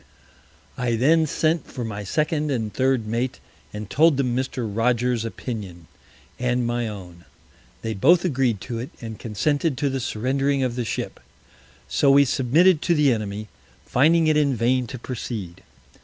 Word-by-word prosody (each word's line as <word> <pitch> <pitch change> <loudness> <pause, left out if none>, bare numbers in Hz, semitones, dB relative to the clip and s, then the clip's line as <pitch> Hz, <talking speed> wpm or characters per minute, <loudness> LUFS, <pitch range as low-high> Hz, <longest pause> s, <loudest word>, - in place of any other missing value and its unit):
I 120 -2 0
then 155 +7 +3
sent 160 0 0
for 120 - -5
my 105 -2 -5
Second 150 - 0
and 110 -6 -2
Third 130 -3 +1
Mate, 120 +4 -2 0.3
and 105 0 -6
told 155 - +4
them 125 -3 0
Mr. 130 -2 -2
Rogers's 115 +2 0
Opinion 105 -7 -6 0.5
and 125 0 0
my 120 0 -1
own. 90 -5 -9 0.6
They 115 0 -2
both 165 - +4
agreed 130 - +1
to 120 -3 -5
it, 125 - -5
and 110 -2 -7
consented 145 +6 -1
to 140 0 0
the 135 - -2
surrendering 135 +4 0
of 125 -2 -1
the 125 -1 -2
Ship. 110 - -4 0.7
So 140 - +2
we 140 +1 +6
submitted 150 +7 +3
to 170 - +2
the 145 -4 +4
Enemy, 105 -1 -4 0.4
finding 160 +6 +3
it 155 -1 +3
in 140 -3 +2
vain 125 +2 +1
to 130 - -7
proceed. 110 -7 -6
125 Hz, 160 wpm, -23 LUFS, 115-140 Hz, 0.7 s, we